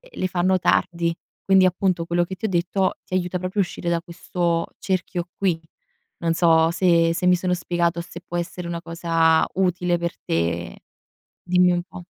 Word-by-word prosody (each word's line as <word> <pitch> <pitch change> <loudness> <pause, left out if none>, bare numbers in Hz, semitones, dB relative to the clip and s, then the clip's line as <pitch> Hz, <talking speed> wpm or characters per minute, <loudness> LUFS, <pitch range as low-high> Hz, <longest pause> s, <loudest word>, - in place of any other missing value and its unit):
le - - -4
fanno 185 +1 +2
tardi. 170 -1 +1 0.3
Quindi 190 -1 +5
appunto, 180 -2 0
quello 175 +1 +1
che 190 +2 -7
ti 220 - -2
ho - - -3
detto 185 +2 0
ti - - -24
aiuta 180 0 -1
proprio 185 +3 -2
a - - +4
uscire 175 0 -4
da 170 -1 +1
questo 170 0 -2
cerchio 180 -2 -2
qui. 180 -5 0 0.6
Non 165 -1 0
so 165 -1 +4
se 170 -2 +3
se 180 - -1
mi 180 0 +5
sono 180 +1 -1
spiegato, 175 -1 -1
se 170 +1 -9
può 175 -1 -4
essere 175 +1 -5
una 170 0 -4
cosa 165 -1 +2
utile 180 -2 +1
per 170 0 -3
te. 85 +1 -2 0.7
Dimmi 180 0 +4
un 175 0 0
po'. 180 -1 -11
175 Hz, 180 wpm, -23 LUFS, 170-185 Hz, 0.7 s, Quindi